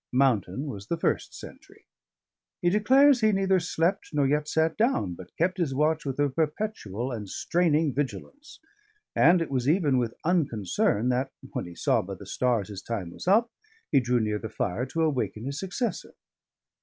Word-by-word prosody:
Mountain 125 -3 +1
was 100 -9 -7
the 170 - -1
first - - -1
sentry; - - -13 0.7
he 175 - +2
declares 260 +6 +5
he 215 0 +4
neither 195 -1 +2
slept 175 +3 -1
nor 145 -2 +3
yet 150 +2 +1
sat 160 +1 +1
down, 215 - +1
but 90 +1 -11
kept 185 +3 0
his 145 -6 0
watch 155 +2 +1
with 135 +1 -3
a 145 - +3
perpetual 145 - -3
and 105 -5 -6
straining 160 - +1
vigilance, 145 - -5 0.6
and 170 +2 +5
it 155 - -9
was 130 0 0
even 150 -6 +3
with 115 -2 -2
unconcern 120 - +1
that 130 +2 0 0.2
(when - - -4
he 85 - -11
saw - - +2
by 95 +1 -7
the 100 - -12
stars 115 0 0
his 100 -2 -7
time 100 -7 -4
was - - -10
up) 225 +5 +4 0.4
he 140 - +5
drew 125 -1 +1
near 105 -1 -1
the 110 - -6
fire 110 +3 -2
to 165 +5 -1
awaken 120 -8 -1
his 140 +2 -4
successor. 195 +5 -4
140 Hz, 180 wpm, -27 LUFS, 115-175 Hz, 0.7 s, declares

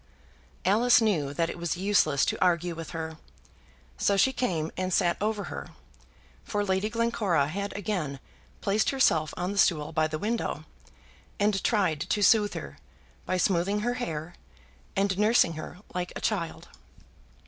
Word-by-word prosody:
Alice 230 +6 +5
knew 175 -11 +1
that 165 +3 0
it - - -9
was 170 +1 -2
useless 180 -7 +3
to - - 0
argue 175 -1 +2
with 165 0 -7
her, 160 -1 -5 0.8
so 200 - +2
she 265 +6 +4
came 165 -11 -1
and 185 0 -2
sat 175 -1 +2
over 210 -1 -1
her, - - -6 0.8
for 205 -1 -2
Lady 190 +2 0
Glencora 220 -9 +1
had 200 +4 -3
again 180 -10 -3 0.4
placed 205 +2 +1
herself 165 - +2
on 180 +1 -2
the 200 - -2
stool 155 -4 +3
by 155 -1 +1
the 155 0 -4
window, 225 +7 -2 0.7
and 205 -1 +1
tried 190 -9 +2
to 205 +6 0
sooth 210 -1 +4
her 70 -1 -7 0.5
by 185 - 0
smoothing 190 +2 +1
her 240 +3 0
hair, 165 -9 -4 0.6
and 195 -1 +1
nursing 210 -5 +4
her 155 +3 -8 0.2
like 180 -1 -3
a - - -4
child. 180 -7 -2
190 Hz, 155 wpm, -28 LUFS, 165-210 Hz, 0.8 s, Alice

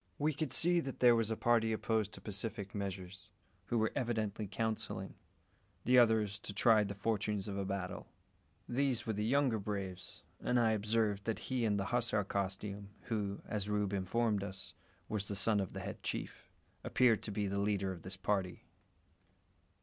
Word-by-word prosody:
We 150 +2 +1
could 150 -2 -2
see 175 +5 +4
that 135 -5 -4
there 120 -1 +7
was 115 -2 +1
a 110 - -1
party 115 -1 +3
opposed 110 -1 0
to - - -9
pacific 105 0 -4
measures, 95 -1 -5 0.4
who 120 - 0
were 110 -1 +2
evidently 110 -4 -1
counselling, 110 +3 -3 0.7
the 125 +1 +7
others 110 -4 +3
to 100 -1 -6
try 110 +1 +5
the 100 0 -4
fortunes 105 -1 -1
of 100 - -3
a 100 0 -2
battle. 95 -1 -4 0.6
These 130 -1 0
were 110 - -1
the 105 +1 -1
younger 125 -1 +2
braves; 95 -3 -5 0.2
and 125 - +2
I 115 -2 +4
observed 105 -1 +1
that 115 - 0 0.2
he 125 -3 +2
in 105 -2 +2
the 100 - -1
hussar 115 -4 +2
costume, 100 +1 -3 0.2
who, 100 -3 -2
as 105 -1 -3
Rube 105 -1 0
informed 100 +2 +1
us, 95 -1 -7 0.3
was 100 -2 -2
the 100 - -3
son 105 +2 +3
of 95 -2 -3
the - - -5
head - - -6
chief, - - -5 0.3
appeared 120 -4 +4
to 105 - -5
be 105 0 -1
the 100 0 -1
leader 100 -1 +1
of 90 -3 -7
this 95 +2 -7
party. 95 -2 -1
105 Hz, 180 wpm, -35 LUFS, 100-115 Hz, 0.7 s, there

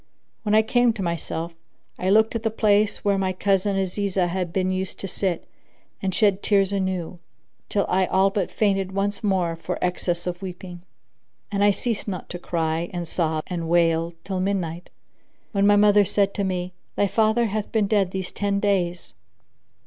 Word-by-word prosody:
When 210 -1 +1
I 220 - +6
came 245 +1 +3
to 210 -4 -4
myself, 170 -1 -3 0.5
I 185 - 0
looked 220 +3 +4
at 230 - -1
the 225 - 0
place 210 -1 +2
where 200 -1 +2
my 190 -1 0
cousin 195 +1 +1
Azizah 190 -1 0
had 180 -1 -2
been 185 +1 0
used 185 0 -3
to 195 - -3
sit 185 -2 -2 0.5
and 195 - 0
shed 205 -3 +3
tears 200 -1 +2
anew, 185 -3 -2 0.5
till 200 -2 +1
I 185 0 +2
all 195 +1 +3
but 195 -3 -1
fainted 195 -3 0
once 200 +2 -1
more 185 -5 +1
for 180 +2 -4
excess 175 -1 -1
of 180 0 -4
weeping; 180 -1 -8 0.7
and 200 -1 +1
I 205 - +6
ceased 220 +2 -2
not 185 -4 -5
to 175 - -6
cry 165 -1 -1
and 175 -2 -4
sob 160 -2 -1
and 170 -3 -4
wail 165 0 +2
till 190 -2 -3
midnight, 180 -3 -2 0.6
when 200 -1 +2
my 205 - +6
mother 205 0 +6
said 200 +1 +1
to 200 - -2
me, 185 -1 -2 0.2
"Thy 205 - +2
father 220 +4 +2
hath 215 -1 -3
been 220 -2 +2
dead 200 -2 +2
these 190 -1 -4
ten 200 -1 -1
days." 180 - -1
190 Hz, 180 wpm, -24 LUFS, 180-205 Hz, 0.7 s, I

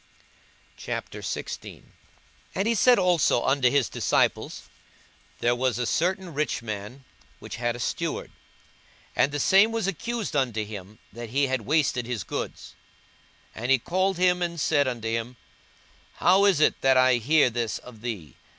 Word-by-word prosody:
42:016:001 - - -6 0.7
And 195 - 0
he 230 - +3
said 245 +3 +5
also 175 -10 +3
unto 135 -2 +3
his 140 -2 +2
disciples, - - 0 0.8
There 120 0 +3
was 125 0 0
a 125 - -1
certain 180 +4 -1
rich 145 -5 -1
man, 110 +4 -6 0.3
which - - -8
had 120 0 -1
a - - -8
steward; - - -3 0.8
and - - +3
the 145 - -2
same 195 +9 +5
was 225 -3 -1
accused 220 +1 -3
unto 120 -6 0
him 105 0 -9 0.2
that 120 0 -7
he 140 +4 +2
had 130 -2 -1
wasted 135 -6 +1
his 120 -6 -3
goods. - - -6 0.8
42:016:002 - - -8
And 120 +3 0
he - - +5
called 185 +8 0
him, 180 0 +3
and 170 -1 -2
said 145 -2 +2
unto 120 -3 -3
him, 115 +2 -3 0.8
How 190 +3 +4
is 195 -7 +4
it 155 - +2
that 135 -1 +4
I 130 -1 +5
hear 140 +2 +3
this 115 -1 -2
of 115 -4 -13
thee? 100 - -6
130 Hz, 160 wpm, -26 LUFS, 120-175 Hz, 0.8 s, said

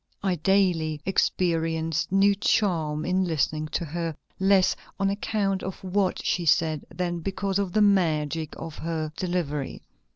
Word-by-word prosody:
I 190 -2 +2
daily 170 -4 +2
experienced 165 -3 0
new 195 +1 +5
charm 165 -7 +1
in 185 +1 +1
listening 155 -2 0
to 170 - -2
her, 165 0 -3 0.2
less 190 -1 +4 0.2
on 195 0 +2
account 200 -1 -1
of 190 - -4
what 190 0 0
she 180 - +1
said 155 -2 +2
than 175 0 -2
because 195 +2 -2
of 195 -3 -1
the 215 - +4
magic 160 -5 +1
of 160 -2 -7
her 160 -2 -3
delivery." 170 -7 -3
175 Hz, 140 wpm, -26 LUFS, 160-195 Hz, 0.2 s, new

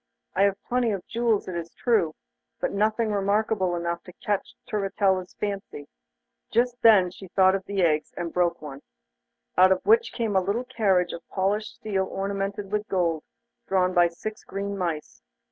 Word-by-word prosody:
I 190 - +2
have 200 -1 +1
plenty 245 -1 +1
of 195 -4 -3
jewels, 230 -3 0
it 185 - -4
is 170 -1 -6
true, 215 -10 +1 0.4
but - - -1
nothing 215 +2 +1
remarkable 200 -2 +1
enough 170 0 -2
to 180 - -11
catch 205 +2 -3
Turritella's 195 -2 0
fancy.' 195 -8 -5 0.6
Just 245 +2 +1
then 195 -6 +6
she 190 +1 -11
thought 190 +1 +4
of 195 0 -1
the 200 -2 0
eggs, 155 -2 +1
and 170 -1 -4
broke 175 -3 +1
one, 140 -2 -8 0.8
out 185 +1 +7
of 185 - +1
which 455 +2 +4
came 225 -4 -2
a 190 - +5
little 200 +6 -1
carriage 195 -8 +1
of 170 - -6
polished 205 +3 -1
steel 195 -3 -1
ornamented 195 0 -3
with 210 0 -1
gold, 170 -4 0 0.5
drawn 185 -1 +2
by 175 -1 +5
six 215 +6 -7
green 200 +1 -4
mice. 160 - -4
195 Hz, 170 wpm, -26 LUFS, 180-210 Hz, 0.8 s, out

